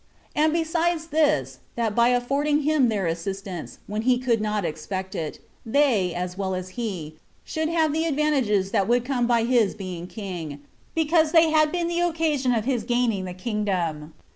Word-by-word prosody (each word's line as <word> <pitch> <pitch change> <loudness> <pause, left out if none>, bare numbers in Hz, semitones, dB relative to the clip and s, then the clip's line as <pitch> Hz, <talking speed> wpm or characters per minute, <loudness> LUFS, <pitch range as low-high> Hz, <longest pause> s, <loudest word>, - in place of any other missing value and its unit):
And 310 +1 +3
besides 330 0 0
this, 145 - +1 0.2
that 230 -3 0
by 235 +2 +4
affording 280 +5 +1
him 295 -4 +3
their 205 -4 0
assistance, 180 +2 -4
when 210 +1 -3
he 250 +2 +3
could 240 -3 +1
not 210 -2 -1
expect 190 +5 -4
it, 155 -2 -4 0.3
they, 225 -7 +2
as 180 0 -3
well 190 -1 -2
as 185 0 -5
he, 185 -8 -5 0.3
should 315 0 -2
have 320 -3 +2
the 320 +1 0
advantages 270 -11 +1
that 195 - +1
would 245 +1 +2
come 250 -3 0
by 235 -2 +3
his 235 -4 +2
being 180 -4 -6
king, 175 -9 -6 0.3
because 320 0 +2
they 325 -1 +6
had 310 -1 +4
been 345 -1 -1
the 345 0 -1
occasion 320 -6 +1
of 225 -3 0
his 255 -3 0
gaining 240 -6 0
the 180 -1 -6
kingdom. 185 -7 -2
235 Hz, 175 wpm, -24 LUFS, 190-300 Hz, 0.3 s, they